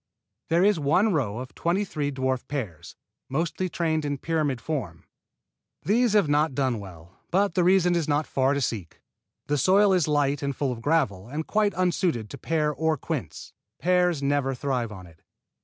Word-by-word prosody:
There 170 +2 +3
is 200 -4 +3
one 180 +9 +2
row 115 -9 -1
of 125 +1 -7
twenty 180 +5 0
three 150 -6 -3
dwarf 130 -1 -2
pears, 95 - -5 0.3
mostly 165 +6 -1
trained 160 -2 -1
in 145 -1 -2
pyramid 150 -4 -1
form. 115 - -5 0.8
These 230 +2 +2
have 205 -6 +4
not 145 -1 +2
done 130 -4 0
well, 90 -2 -12
but 200 +2 +2
the 180 - +2
reason 180 -1 +4
is 170 -3 0
not 150 +1 +1
far 135 +1 +1
to 140 - -1
seek. 105 -9 -4 0.5
The 145 0 0
soil 195 +6 +4
is 180 -5 +2
light 145 -2 +1
and 140 -1 -2
full 135 -1 -1
of 115 -2 -6
gravel, 115 - 0
and 155 +4 -4
quite 210 -3 +1
unsuited 175 - 0
to 140 - -8
pear 155 0 0
or 160 +2 0
quince. - - -5 0.2
Pears 180 -4 +2
never 140 -1 +1
thrive 125 -4 -2
on 95 -3 -9
it. 80 -2 -18
145 Hz, 180 wpm, -26 LUFS, 130-175 Hz, 0.8 s, have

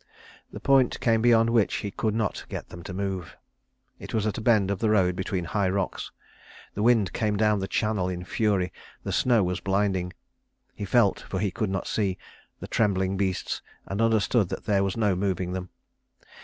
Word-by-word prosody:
The - - -7
point 135 -2 +3
came 115 -2 +2
beyond 115 -1 +4
which 115 -3 +2
he 100 - -3
could 110 +1 -1
not 110 -4 -2
get - - -6
them 85 - -9
to - - -6
move. 95 -2 -4 0.6
It - - -6
was 110 -1 +1
at 110 +1 -1
a - - -5
bend 110 -4 +3
of 100 - -2
the 110 - +1
road 95 -4 +3
between 95 -1 -2
high 100 +2 0
rocks. 95 0 -2 0.6
The 105 - -3
wind 110 -6 +3
came 105 -3 0
down 105 -1 +3
the 95 - -3
channel 105 -4 0
in 90 -1 -4
fury, 95 -2 0 0.3
the - - -3
snow 120 -5 +3
was 90 -1 -1
blinding. 95 -2 0 0.6
He 100 - -5
felt, 105 -1 +3
for 95 - -6
he 100 -1 0
could 105 +2 -2
not 95 0 -2
see, 95 -4 -1 0.4
the - - -7
trembling 95 -3 +1
beasts, 95 -1 -2 0.2
and 100 +3 -3
understood 110 -2 +2
that - - -5
there 100 -2 +2
was 100 +2 -2
no 105 -4 +2
moving 90 -1 -1
them. 90 -1 -5
100 Hz, 195 wpm, -26 LUFS, 95-110 Hz, 0.6 s, beyond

